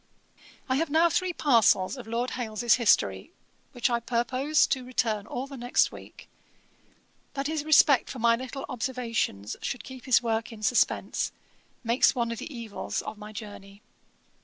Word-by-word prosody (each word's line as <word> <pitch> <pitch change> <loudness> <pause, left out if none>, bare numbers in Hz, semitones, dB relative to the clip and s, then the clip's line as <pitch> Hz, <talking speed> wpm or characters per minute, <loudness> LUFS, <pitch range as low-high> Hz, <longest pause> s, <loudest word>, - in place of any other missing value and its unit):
'I 260 0 +1
have 325 +1 0
now 330 +3 +4
three 370 +2 0
parcels 230 - +3
of 250 -4 -10
Lord 235 +2 -2
Hailes's 235 -1 0
history, 100 - +2 0.4
which 245 - 0
I 240 -2 0
purpose 255 +5 +1
to 260 -2 -1
return 225 -4 -1
all 250 - -4
the 275 0 -10
next 245 0 +2
week: - - -13 1.1
that 275 0 -2
his 310 0 -2
respect 300 -3 +5
for - - -6
my 230 -1 +4
little 260 +2 -6
observations 230 - -3
should 240 -4 -4
keep 260 -1 -11
his 255 -3 +5
work 225 0 -1
in 215 -2 -11
suspense, 245 +3 +1 0.5
makes 235 +3 +3
one 235 -2 -1
of 230 - -5
the - - -7
evils 230 -5 -5
of 210 - -7
my 210 0 -9
journey. 205 -2 -10
240 Hz, 160 wpm, -27 LUFS, 225-265 Hz, 1.1 s, respect